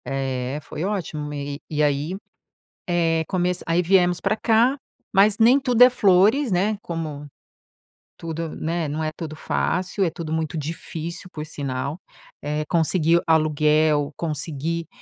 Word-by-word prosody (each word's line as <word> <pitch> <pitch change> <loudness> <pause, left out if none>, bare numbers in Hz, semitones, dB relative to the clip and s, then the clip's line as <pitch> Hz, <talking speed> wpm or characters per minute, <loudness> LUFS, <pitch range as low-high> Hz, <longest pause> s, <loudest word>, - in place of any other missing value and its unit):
É, 135 0 -3
foi 160 - -6
ótimo 180 -7 -3
me 145 -1 -5
e 155 - -5
e 150 - +3
aí, 145 +4 0 0.7
eh, 165 -2 +1
começa 180 -1 -1
aí, 165 +2 +2
viemos 180 -1 +3
pra 205 +2 0
cá, 235 +5 +3 0.3
mas 200 +1 +5
nem 240 +5 +5
tudo 245 -2 +3
é 250 - +9
flores, 215 +4 +3
né, 200 +3 +1
como 155 -4 -5 0.9
tudo, 165 0 -5
né, 165 +1 -2
não 150 +2 -3
é 155 - -1
tudo 155 -2 -6
fácil. 185 +5 -1
É - - +2
tudo 160 -2 -6
muito 160 0 -2
difícil, 160 +3 -5
por 150 - -5
sinal. 140 +1 -4 0.4
Eh, 150 +1 -2
conseguir 170 0 +3
aluguel, 155 -1 +2
conseguir, 160 +1 -3
165 Hz, 145 wpm, -23 LUFS, 150-185 Hz, 0.9 s, é